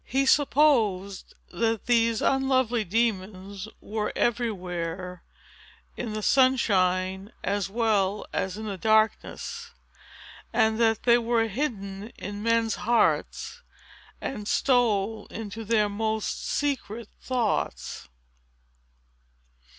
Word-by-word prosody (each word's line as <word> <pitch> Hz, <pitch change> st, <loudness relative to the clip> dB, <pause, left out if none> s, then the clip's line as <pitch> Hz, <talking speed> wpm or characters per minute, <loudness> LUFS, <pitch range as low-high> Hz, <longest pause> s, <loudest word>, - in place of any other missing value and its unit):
He 270 Hz, +2 st, 0 dB
supposed 235 Hz, -10 st, +2 dB, 0.2 s
that 225 Hz, +3 st, 0 dB
these 230 Hz, -2 st, +2 dB
unlovely 260 Hz, -4 st, +2 dB
demons 200 Hz, -1 st, -2 dB
were 210 Hz, 0 st, -3 dB
everywhere, 180 Hz, -6 st, -2 dB, 0.7 s
in 225 Hz, -3 st, -4 dB
the 215 Hz, 0 st, -4 dB
sunshine 190 Hz, -7 st, +2 dB
as 200 Hz, -1 st, -1 dB
well 210 Hz, -2 st, +1 dB
as 190 Hz, +1 st, -2 dB
in 220 Hz, -, -6 dB
the 200 Hz, -3 st, -5 dB
darkness, 220 Hz, -, +1 dB, 0.8 s
and 220 Hz, -1 st, +2 dB
that 225 Hz, -2 st, +2 dB
they 240 Hz, 0 st, +5 dB
were 230 Hz, -1 st, +1 dB
hidden 210 Hz, -4 st, -4 dB
in 205 Hz, +1 st, -6 dB
men's 230 Hz, 0 st, +1 dB
hearts, 235 Hz, -, 0 dB, 0.6 s
and 210 Hz, -6 st, -5 dB
stole 225 Hz, -5 st, +1 dB
into 225 Hz, 0 st, -6 dB
their 215 Hz, -1 st, +2 dB
most 220 Hz, +1 st, -2 dB
secret 235 Hz, -6 st, -2 dB
thoughts." 245 Hz, -5 st, -2 dB
220 Hz, 95 wpm, -26 LUFS, 200-235 Hz, 0.8 s, they